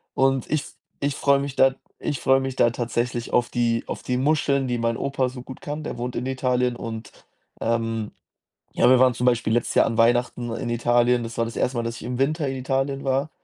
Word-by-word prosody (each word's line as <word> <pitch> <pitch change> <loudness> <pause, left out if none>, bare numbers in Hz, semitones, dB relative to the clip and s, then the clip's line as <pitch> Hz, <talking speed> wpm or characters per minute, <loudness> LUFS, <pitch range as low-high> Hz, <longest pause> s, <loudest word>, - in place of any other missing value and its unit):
Und 135 -1 +2
ich 155 - +2
f - - -12 0.3
ich 140 -1 0
freue 140 -1 +3
mich 140 -1 -4
da 135 0 +4 0.3
ich 145 - -1
freue 135 0 +4
mich 135 -1 -3
da 120 - +5
tatsächlich 120 0 -2
auf 120 -1 +2
die 115 -1 0
auf - - -5
die 125 - -1
Muscheln, 140 -1 +1
die 120 -1 -1
mein 115 0 0
Opa 135 -2 -1
so 125 0 -9
gut 130 0 -10
kann. 150 +1 -5
Der - - -5
wohnt 125 +1 -4
in 125 - -2
Italien 125 -2 0
und, 110 -1 -7 0.5
ähm, 115 -2 -1 0.6
ja, 120 - +4
wir 130 - +7
waren 130 -1 +5
zum 120 +1 -2
Beispiel 120 -3 +2
letztes 120 - 0
Jahr - - +6
an 115 - -2
Weihnachten 120 +1 +2
in 120 0 -4
Italien. 120 +1 +2
Das 115 0 -7
war 115 - +2
das 115 - -7
1. 125 - 0
Mal, 115 - 0
dass 115 0 -4
ich - - -10
im 125 +2 -4
Winter 150 +1 +1
in 135 - -2
Italien 135 +1 -1
war. 135 +3 0
125 Hz, 230 wpm, -24 LUFS, 120-135 Hz, 0.6 s, wir